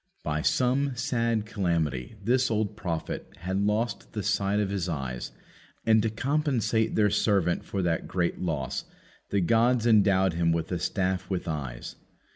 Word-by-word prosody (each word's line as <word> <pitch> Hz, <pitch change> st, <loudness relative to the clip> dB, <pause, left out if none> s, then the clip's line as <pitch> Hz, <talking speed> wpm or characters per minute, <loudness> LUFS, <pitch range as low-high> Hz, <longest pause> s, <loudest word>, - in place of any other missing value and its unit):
By 75 Hz, 0 st, -1 dB
some 130 Hz, -, +1 dB
sad 115 Hz, -3 st, 0 dB
calamity 85 Hz, -, -1 dB
this 125 Hz, +4 st, +2 dB
old 110 Hz, -1 st, -1 dB
prophet 85 Hz, -7 st, -4 dB
had 95 Hz, +3 st, -1 dB
lost 105 Hz, 0 st, -1 dB
the 105 Hz, -3 st, -3 dB
sight 100 Hz, +2 st, +1 dB
of 100 Hz, -2 st, 0 dB
his 95 Hz, -3 st, -2 dB
eyes, 65 Hz, -6 st, -4 dB, 0.5 s
and 110 Hz, -1 st, +5 dB
to 110 Hz, -, +1 dB
compensate 120 Hz, -3 st, 0 dB
their 105 Hz, -2 st, +3 dB
servant 100 Hz, -4 st, +2 dB
for 95 Hz, -2 st, -3 dB
that 85 Hz, -2 st, 0 dB
great 90 Hz, -2 st, -1 dB
loss 75 Hz, -7 st, -2 dB, 0.4 s
the 100 Hz, -, +1 dB
gods 115 Hz, +5 st, +3 dB
endowed 100 Hz, -5 st, +4 dB
him 85 Hz, 0 st, +2 dB
with 80 Hz, +1 st, -1 dB
a 90 Hz, -, -1 dB
staff 95 Hz, +1 st, -1 dB
with 95 Hz, -3 st, -2 dB
eyes. 70 Hz, -7 st, -5 dB
100 Hz, 155 wpm, -27 LUFS, 85-115 Hz, 0.5 s, and